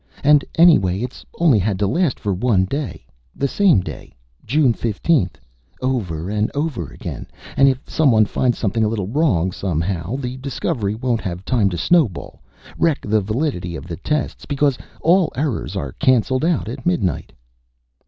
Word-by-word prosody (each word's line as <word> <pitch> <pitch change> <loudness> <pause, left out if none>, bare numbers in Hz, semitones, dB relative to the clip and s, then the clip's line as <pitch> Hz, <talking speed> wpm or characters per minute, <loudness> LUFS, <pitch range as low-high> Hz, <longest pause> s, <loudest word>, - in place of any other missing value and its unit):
And 145 0 +5
anyway, 105 - +5
it 125 +1 -6
only 155 -10 +4
has 100 0 0
to 100 - +1
last 160 - 0
for 100 -2 -1
one 95 -1 +2
day. 140 +6 -5 0.3
The 140 - 0
same 180 - +3
day - - -9 0.3
June 135 0 +3
15th 110 - 0 0.4
over 95 -11 -2
and 105 +1 0
over 145 - -2
again; - - -7 0.3
and 135 0 +6
if 130 0 -3
someone 120 -9 +3
finds 120 +3 0
something 110 +2 0
a - - +3
little 105 -3 -2
wrong, 100 - +1
somehow, 90 +2 -2
the 130 -2 -4
discovery 130 - -2
won't 120 0 -1
have 90 -1 -5
time 115 -6 +2
to 90 - -4
snowball, 135 - +1 0.4
wreck 165 -4 +2
the 105 0 +1
validity 105 - -2
of 70 - -7
the 85 -3 -5
tests, 150 +8 -3
because 140 -1 +1 0.3
all 175 +1 +3
errors 135 -4 -2
are 70 -2 -3
canceled 130 - +2
out 165 -9 +1
at 125 +3 -6
midnight." 100 - -1
120 Hz, 165 wpm, -20 LUFS, 95-145 Hz, 0.4 s, and